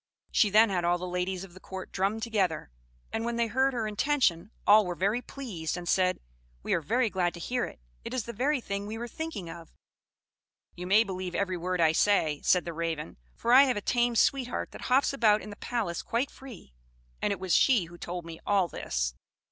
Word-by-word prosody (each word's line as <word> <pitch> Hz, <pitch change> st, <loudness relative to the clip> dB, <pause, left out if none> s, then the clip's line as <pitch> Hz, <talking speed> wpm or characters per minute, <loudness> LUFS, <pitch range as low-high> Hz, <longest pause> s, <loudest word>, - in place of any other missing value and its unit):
She 210 Hz, -, +4 dB
then 215 Hz, +1 st, +5 dB
had 180 Hz, -2 st, 0 dB
all 175 Hz, +1 st, +2 dB
the 180 Hz, +1 st, -5 dB
ladies 180 Hz, +1 st, -2 dB
of 185 Hz, -3 st, -12 dB
the 185 Hz, -, -13 dB
court 190 Hz, 0 st, -8 dB
drummed 200 Hz, +4 st, -1 dB
together; 190 Hz, -, -1 dB, 0.4 s
and 225 Hz, -, -1 dB
when 235 Hz, 0 st, -2 dB
they 235 Hz, 0 st, +2 dB
heard 260 Hz, +4 st, +2 dB
her 230 Hz, -2 st, -1 dB
intention, 210 Hz, -, +1 dB, 0.2 s
all 210 Hz, +1 st, +7 dB
were 180 Hz, -2 st, -3 dB
very 200 Hz, +7 st, 0 dB
pleased, 195 Hz, -, -5 dB
and 175 Hz, -1 st, -7 dB
said, 185 Hz, 0 st, +2 dB, 0.4 s
'We -, -, 0 dB
are 170 Hz, -, +1 dB
very 235 Hz, -, +1 dB
glad 180 Hz, -2 st, 0 dB
to -, -, -9 dB
hear 245 Hz, +7 st, -1 dB
it; -, -, -11 dB, 0.2 s
it -, -, -6 dB
is 255 Hz, -3 st, -1 dB
the 235 Hz, -, -6 dB
very 270 Hz, +6 st, +1 dB
thing 200 Hz, -1 st, -4 dB
we 220 Hz, +1 st, -5 dB
were 240 Hz, +1 st, -5 dB
thinking 320 Hz, -, -5 dB
of.' 165 Hz, 0 st, -10 dB, 1.0 s
You 180 Hz, +1 st, -7 dB
may 210 Hz, +4 st, +6 dB
believe 185 Hz, -3 st, -5 dB
every 190 Hz, -2 st, 0 dB
word 180 Hz, +1 st, -2 dB
I 160 Hz, -2 st, +5 dB
say," 160 Hz, -4 st, +2 dB
said 180 Hz, -, +3 dB
the 170 Hz, -, -4 dB
Raven; 160 Hz, -2 st, -4 dB, 0.2 s
"for 235 Hz, -, +1 dB
I 270 Hz, +2 st, +9 dB
have 255 Hz, -5 st, 0 dB
a -, -, +1 dB
tame 240 Hz, +2 st, +1 dB
sweetheart 250 Hz, +1 st, +1 dB
that -, -, -9 dB
hops 265 Hz, +2 st, +3 dB
about 215 Hz, -6 st, +4 dB
in 210 Hz, -, -8 dB
the -, -, -8 dB
palace 210 Hz, -9 st, -2 dB
quite 240 Hz, +4 st, -1 dB
free, 240 Hz, -, -12 dB, 0.5 s
and -, -, +1 dB
it 200 Hz, -, -2 dB
was 185 Hz, -2 st, -1 dB
she 240 Hz, -10 st, +4 dB
who 170 Hz, +1 st, -13 dB
told 175 Hz, -1 st, -5 dB
me 165 Hz, -1 st, -9 dB
all 195 Hz, -3 st, +2 dB
this. 60 Hz, -, -2 dB
200 Hz, 220 wpm, -29 LUFS, 175-235 Hz, 1.0 s, I